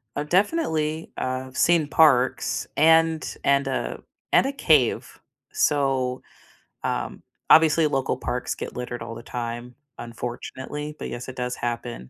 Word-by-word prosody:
I've 150 Hz, +1 st, -3 dB
definitely, 165 Hz, -, 0 dB
uh, 130 Hz, 0 st, -3 dB
seen 165 Hz, 0 st, +3 dB
parks 140 Hz, -5 st, +3 dB
and 160 Hz, 0 st, +3 dB
and 140 Hz, 0 st, +2 dB
a -, -, -3 dB, 0.3 s
and -, -, +5 dB
a 270 Hz, -, 0 dB
cave, 275 Hz, -, +2 dB, 0.3 s
so, 135 Hz, -, +1 dB, 0.6 s
um, -, -, -3 dB, 0.3 s
obviously, 160 Hz, 0 st, +6 dB
local 135 Hz, -2 st, -1 dB
parks 125 Hz, 0 st, -3 dB
get -, -, -7 dB
littered 125 Hz, -1 st, -5 dB
all 115 Hz, 0 st, -6 dB
the 115 Hz, -, -8 dB
time, 120 Hz, 0 st, -5 dB, 0.2 s
unfortunately, 130 Hz, +5 st, -6 dB
but, -, -, -6 dB
yes, 120 Hz, +1 st, -6 dB
it 130 Hz, -, -7 dB
does 125 Hz, -1 st, -3 dB
happen, 120 Hz, -, -5 dB
135 Hz, 135 wpm, -24 LUFS, 125-155 Hz, 0.6 s, obviously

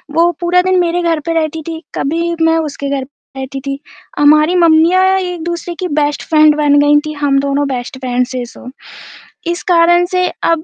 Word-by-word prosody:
वो 340 Hz, +1 st, +3 dB
पूरा 355 Hz, +1 st, +2 dB
दिन 370 Hz, 0 st, +1 dB
मेरे 350 Hz, 0 st, 0 dB
घर 335 Hz, -2 st, 0 dB
पे 330 Hz, -, 0 dB
रहती 320 Hz, 0 st, -2 dB
थी, 325 Hz, 0 st, -6 dB
कभी 335 Hz, +4 st, -2 dB
मैं 325 Hz, 0 st, +3 dB
उसके 290 Hz, -3 st, -4 dB
घर 275 Hz, -1 st, -2 dB
पे 270 Hz, 0 st, -15 dB
रहती 270 Hz, +1 st, -6 dB
थी। 275 Hz, 0 st, -3 dB, 0.4 s
हमारी 305 Hz, +4 st, +4 dB
मम्मियाँ 340 Hz, +2 st, +4 dB
एक-दूसरे 345 Hz, -1 st, -5 dB
की 365 Hz, -, -2 dB
बेस्ट 290 Hz, 0 st, -2 dB
फ्रेंड 305 Hz, -1 st, +5 dB
बन 290 Hz, -1 st, +3 dB
गई 290 Hz, 0 st, +4 dB
थी, 305 Hz, -, -5 dB
हम 285 Hz, -2 st, 0 dB
दोनों 280 Hz, +1 st, -1 dB
बेस्ट 260 Hz, 0 st, -5 dB
फ्रेंड 250 Hz, -1 st, -1 dB
से 250 Hz, -2 st, -5 dB
सो। 245 Hz, +1 st, -12 dB, 0.8 s
इस 345 Hz, +1 st, -2 dB
कारण 345 Hz, +1 st, +4 dB
से 365 Hz, -1 st, +1 dB, 0.2 s
अब 330 Hz, -1 st, +1 dB
315 Hz, 190 wpm, -14 LUFS, 285-345 Hz, 0.8 s, फ्रेंड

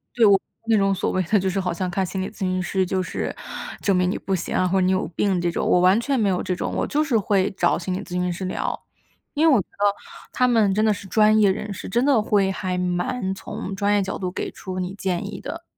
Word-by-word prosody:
对， 235 Hz, -2 st, +5 dB
我 200 Hz, -2 st, +7 dB
不 -, -, -21 dB, 0.3 s
是 -, -, +6 dB
那 -, -, +4 dB
种 195 Hz, -1 st, +2 dB
所 190 Hz, -, -1 dB
谓 185 Hz, -, +1 dB
的 205 Hz, +5 st, +2 dB
就 190 Hz, 0 st, 0 dB
是 195 Hz, -, -1 dB
好 180 Hz, -2 st, -1 dB
像 180 Hz, +1 st, -2 dB
看 190 Hz, +2 st, -1 dB
心 190 Hz, +1 st, -4 dB
理 190 Hz, -, -3 dB
咨 -, -, -18 dB
询 185 Hz, -1 st, 0 dB
师 190 Hz, +1 st, 0 dB
就 185 Hz, +1 st, -1 dB
是 185 Hz, -, -4 dB, 0.5 s
证 195 Hz, -, +2 dB
明 180 Hz, 0 st, +2 dB
你 -, -, -1 dB
不 195 Hz, -, -2 dB
行 175 Hz, -, -4 dB
啊， 185 Hz, -, +2 dB
或 190 Hz, +1 st, +2 dB
者 185 Hz, -, +2 dB
你 185 Hz, -, +3 dB
有 185 Hz, -, 0 dB
病 190 Hz, -4 st, +1 dB
这 175 Hz, -, 0 dB
种， -, -, -2 dB
我 180 Hz, -, +4 dB
完 185 Hz, +5 st, +5 dB
全 270 Hz, +1 st, 0 dB
没 205 Hz, -3 st, +2 dB
有 180 Hz, -, 0 dB
这 180 Hz, -, -1 dB
种， -, -, -3 dB
我 -, -, 0 dB
就 300 Hz, +1 st, +1 dB
是 265 Hz, -7 st, +1 dB
会 200 Hz, -1 st, +1 dB
找 175 Hz, -, +2 dB
心 180 Hz, +2 st, -3 dB
理 185 Hz, -, -2 dB
咨 180 Hz, -, -15 dB
询 180 Hz, 0 st, 0 dB
师 185 Hz, +2 st, -4 dB
聊。 185 Hz, -, -2 dB, 0.5 s
因 310 Hz, +2 st, +3 dB
为 -, -, +6 dB
我 -, -, +4 dB
觉 190 Hz, -, -5 dB
得 205 Hz, 0 st, 0 dB, 0.4 s
他 250 Hz, -, +2 dB
们 225 Hz, -5 st, +3 dB
真 215 Hz, +1 st, +2 dB
的 215 Hz, -, +4 dB
是 200 Hz, 0 st, -9 dB
专 215 Hz, +2 st, +4 dB
业 205 Hz, -2 st, +5 dB
人 205 Hz, +1 st, -4 dB
士， 195 Hz, -, -7 dB
真 240 Hz, +7 st, +1 dB
的 270 Hz, -6 st, +4 dB
会 200 Hz, -2 st, +2 dB
还 185 Hz, -1 st, -3 dB
蛮 180 Hz, +3 st, -1 dB
从 195 Hz, 0 st, -6 dB
专 205 Hz, +1 st, +1 dB
业 205 Hz, -, +3 dB
角 190 Hz, -, -4 dB
度 180 Hz, -1 st, -3 dB
给 -, -, -4 dB
出 185 Hz, -1 st, -6 dB
你 180 Hz, +1 st, -3 dB
建 185 Hz, -3 st, -2 dB
议 -, -, -7 dB
的。 -, -, -6 dB
190 Hz, 310 characters per minute, -23 LUFS, 185-210 Hz, 0.5 s, 我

